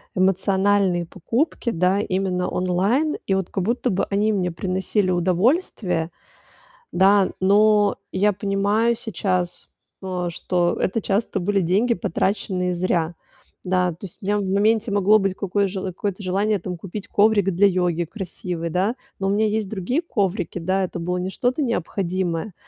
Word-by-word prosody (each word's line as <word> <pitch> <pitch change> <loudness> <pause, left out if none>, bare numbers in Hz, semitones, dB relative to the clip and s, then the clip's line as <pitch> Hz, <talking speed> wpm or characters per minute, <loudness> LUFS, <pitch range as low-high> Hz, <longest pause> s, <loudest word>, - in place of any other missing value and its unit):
эмоциональные 190 -1 +2
покупки, 235 - -2
да, 185 0 +2
именно 185 -2 -1
онлайн. 195 - +1
И 195 - +2
вот 190 -2 -2
как 190 - -2
будто 240 +4 0
бы 190 - 0
они 210 +2 +1
мне 180 -3 0
приносили 185 +3 -1
удовольствие. 180 - +1 0.8
Да, 195 +1 +4
но 205 +1 +4
я 205 +2 +2
понимаю 205 +4 +1
сейчас 185 -6 -2 0.3
то, 180 -2 -3
что 175 +1 0
это 220 +4 0
часто 205 +3 -1
были 195 +2 +1
деньги, 205 +8 +2
потраченные 185 +1 -1
зря. 170 -2 0 0.5
Да, 180 -1 +1
то 165 - -10
есть 190 - -8
у - - -9
меня 205 +1 +1
в - - -1
моменте 210 +3 +2
могло 205 +2 +4
быть 195 -2 0
какое 200 +1 0
жел 190 0 -4
какое-то 195 +2 -4
желание 200 +3 +1
там 180 0 -6
купить 200 +4 -7
коврик 205 -2 +3
для 200 +4 +4
йоги, 175 -2 +1
красивый, 175 -2 -5
да, 195 +9 0 0.2
но 195 - -2
у - - +1
меня 215 +2 +2
есть 215 -1 -1
другие 220 - -1
коврики. 200 - -2
Да, 190 +3 0
это 180 -1 -3
было 180 +2 -2
не 180 +1 -2
что-то 250 +8 -1
необходимое. 185 - -2
195 Hz, 155 wpm, -22 LUFS, 180-210 Hz, 0.8 s, Да